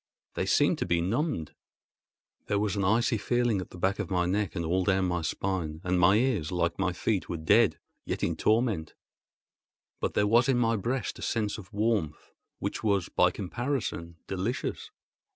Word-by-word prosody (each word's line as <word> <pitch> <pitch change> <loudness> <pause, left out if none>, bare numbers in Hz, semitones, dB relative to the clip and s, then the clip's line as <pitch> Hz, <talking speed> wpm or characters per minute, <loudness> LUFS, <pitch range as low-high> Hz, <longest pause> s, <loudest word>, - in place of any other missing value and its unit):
They - - -2
seemed - - +3
to - - -1
be 85 -1 +2
numbed. 110 - -1 0.9
There 100 - +1
was 105 -1 0
an 100 - 0
icy 115 +4 +2
feeling 120 -3 +1
at - - -9
the - - -11
back 95 +3 0
of 100 -5 -3
my 90 -2 +1
neck 100 -1 -1
and 85 - -2
all 90 +3 +1
down 95 -1 +2
my 90 -1 -1
spine, 80 -1 -2
and 90 0 +1
my 90 +3 +6
ears, 110 - +1
like 85 0 -1
my 95 -1 +1
feet, 95 +2 -1
were 85 - -2
dead, 100 +7 +4 0.3
yet - - -4
in - - +1
torment; 110 -8 +1 1.0
but - - -2
there 105 - +3
was 120 +5 +4
in 130 - +3
my 115 -1 +2
breast 120 +5 -2
a - - -9
sense 110 -1 -1
of 95 - -12
warmth 105 -8 -1 0.3
which - - -4
was, 100 -5 +1
by - - +3
comparison, 105 -5 -3
delicious. 95 +6 -3
100 Hz, 185 wpm, -28 LUFS, 90-115 Hz, 1.0 s, my